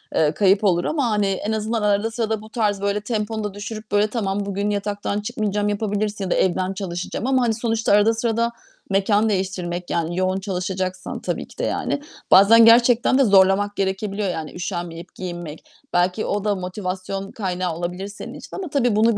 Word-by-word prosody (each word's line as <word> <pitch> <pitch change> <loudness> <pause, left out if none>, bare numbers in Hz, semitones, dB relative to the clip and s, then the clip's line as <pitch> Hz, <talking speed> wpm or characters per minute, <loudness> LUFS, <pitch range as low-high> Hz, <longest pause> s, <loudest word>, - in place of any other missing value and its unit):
eee, 150 -1 +3
kayıp 195 +2 +3
olur 175 -3 +2
ama, 280 -6 0
hani, 210 -2 +1
en 195 +3 -2
azından 220 +1 -1
arada 210 +2 +1
sırada 220 -2 -2
bu 215 - -12
tarz, 210 -4 0
böyle 200 +1 0
temponu 215 0 -2
da 205 -2 -4
düşürüp, 215 +1 -7
böyle, 205 +1 +3
tamam 205 -3 -2
bugün 200 +1 -2
yataktan 205 0 -2
çıkmayacağım, 210 0 -1
yapabilirsin 205 -1 -2
ya 180 - -4
da - - +3
evden 185 +1 +1
çalışacağım 185 +4 -4
ama, 260 -1 +3
hani, 225 -2 +2
sonuçta 225 -1 0
arada 210 +2 +5
sırada 230 +1 0 0.4
mekân 205 +2 +2
değiştirmek, 180 -3 -2
yani, 170 +1 -1
yoğun 185 +1 +1
çalışacaksan 185 -1 -3
tabii - - -3
ki - - -18
de - - -3
yani, 285 - -1 0.3
bazen 225 +4 +8
gerçekten 235 +2 +5
de - - +6
zorlamak 200 0 +4
gerekebiliyor, 195 +1 -1
yani 160 -4 -4
üşenmeyip 175 -1 -5
giyinmek. 175 -4 -7 0.3
Belki 180 +4 +1
o 205 0 -1
da 205 -1 +1
motivasyon 185 +1 -4
kaynağı 185 -4 -2
olabilir 180 +3 -4
senin 205 - -9
için - - -10
ama 385 - -4
tabii, 245 -6 +1
bunu 220 0 +3
205 Hz, 180 wpm, -22 LUFS, 185-215 Hz, 0.4 s, bazen